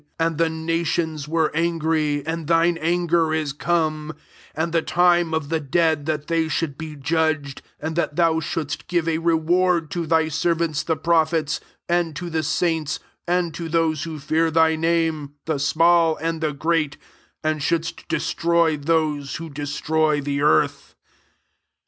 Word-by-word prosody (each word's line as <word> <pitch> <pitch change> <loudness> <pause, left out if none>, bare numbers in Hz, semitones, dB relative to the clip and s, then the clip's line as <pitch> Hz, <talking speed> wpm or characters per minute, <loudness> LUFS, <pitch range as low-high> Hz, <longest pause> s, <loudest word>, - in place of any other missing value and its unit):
18 165 - +3
And 165 -2 -4
the 165 -1 +3
nations 160 -1 -2
were 160 0 +1
an 170 +1 +1
gry, 155 -2 0
and 160 -1 -3
thine 170 +1 +3
anger 170 -1 +1
is 155 -3 -2
come, 155 -1 -1 0.4
and 160 +2 -1
the 165 - +3
time 175 0 +3
of 160 -3 -2
the 165 0 0
dead 155 +1 +1
that 155 -2 -1
they 165 -1 0
should 160 -2 -2
be 155 0 -7
judged, 155 -1 -1 0.2
and 160 +1 -4
that 170 -3 -1
thou 165 -1 +3
shouldst 150 -2 -4
give 175 -2 0
a 160 -1 +1
re 165 0 +2
ward 170 0 +1
to 170 -2 -3
thy 160 0 +3
servants 165 0 0
the 160 -2 -1
pro 170 0 +2
phets, 155 -1 -2 0.3
and 170 -3 0
to 175 +1 -5
the 160 0 0
saints, 160 -2 0 0.3
and 175 -1 0
to 165 +1 -5
those 160 -2 +1
who 160 -2 -5
fear 160 +3 +1
thy 160 0 +3
name, 160 -3 0
the 155 -3 -1
small 165 +2 +3
and 165 0 -3
the 155 -1 0
great; 155 0 0 0.5
and 155 -1 0
shouldst 165 +3 -2
destroy 170 -1 +1
those 150 -2 0
who 165 -1 -7
des 145 +1 -5
troy 155 +1 +1
the 140 0 -2
earth." 80 - +1
160 Hz, 170 wpm, -22 LUFS, 155-165 Hz, 0.5 s, 18